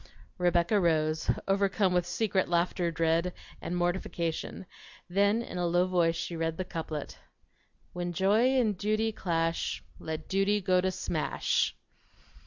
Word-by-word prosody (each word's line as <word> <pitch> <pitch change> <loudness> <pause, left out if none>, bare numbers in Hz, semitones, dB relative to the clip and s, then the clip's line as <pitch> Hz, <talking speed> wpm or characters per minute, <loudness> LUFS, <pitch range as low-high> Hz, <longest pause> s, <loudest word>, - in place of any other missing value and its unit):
Rebecca 175 +3 +3
rose, 155 -3 +1 0.2
overcome 195 -1 +2
with 175 -1 +1
secret 190 -1 0
laughter 175 0 +1
dread, 165 +2 +1 0.3
and 175 - -3
mortification; 175 0 -2 0.4
then 200 +5 +2
in 180 - -6
a 175 - +1
low 175 +1 +3
voice 175 -3 +2
she 170 +1 -4
read 165 0 -2
the 185 - -3
couplet: 160 -4 -5 0.7
When 175 0 -3
Joy 215 +9 +3
and 215 -4 +2
Duty 215 +3 0
clash 165 -5 -1 0.2
Let 160 -1 -5
Duty 195 +2 +2
go 185 -2 +2
to 190 - +1
smash. 185 - 0
180 Hz, 135 wpm, -29 LUFS, 170-195 Hz, 0.7 s, Rebecca